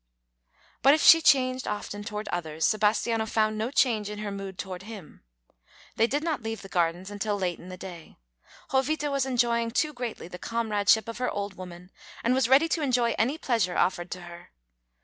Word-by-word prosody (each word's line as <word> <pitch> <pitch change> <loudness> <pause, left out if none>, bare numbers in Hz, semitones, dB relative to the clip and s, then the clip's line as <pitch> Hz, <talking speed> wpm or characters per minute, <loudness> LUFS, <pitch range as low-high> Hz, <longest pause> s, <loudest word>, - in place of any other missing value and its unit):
But 275 +2 +6
if 315 - -1
she 330 - +9
changed 255 -3 +3
often 205 0 -4
toward 210 0 -5
others, 160 -2 -2
Sebastiano 220 +1 +1
found 215 0 +1
no 220 +2 -2
change 235 -6 +1
in 210 - -6
her 210 -1 -4
mood 195 -2 -7
toward 185 -2 -6
him. 200 -5 -11 0.7
They 225 - +3
did 290 +4 -1
not 315 -6 -1
leave 225 -1 -5
the 195 - -10
gardens 175 +2 0
until 205 0 -2
late 180 -3 -2
in 180 - -11
the 185 - -8
day. 175 -3 -10 0.5
Jovita 290 +2 0
was 275 -1 0
enjoying 235 -2 +1
too 300 +6 0
greatly 245 -8 -5
the 180 0 -9
comradeship 220 -2 +1
of 230 +1 -6
her 250 - 0
old 200 -1 -4
woman, 180 0 -11 0.3
and 235 - +2
was 255 -2 +2
ready 275 +5 +6
to 325 - 0
enjoy 245 -4 +2
any 255 +8 +1
pleasure 225 - 0
offered 175 -1 0
to 180 - -6
her. 175 0 -11
215 Hz, 190 wpm, -27 LUFS, 190-250 Hz, 0.7 s, she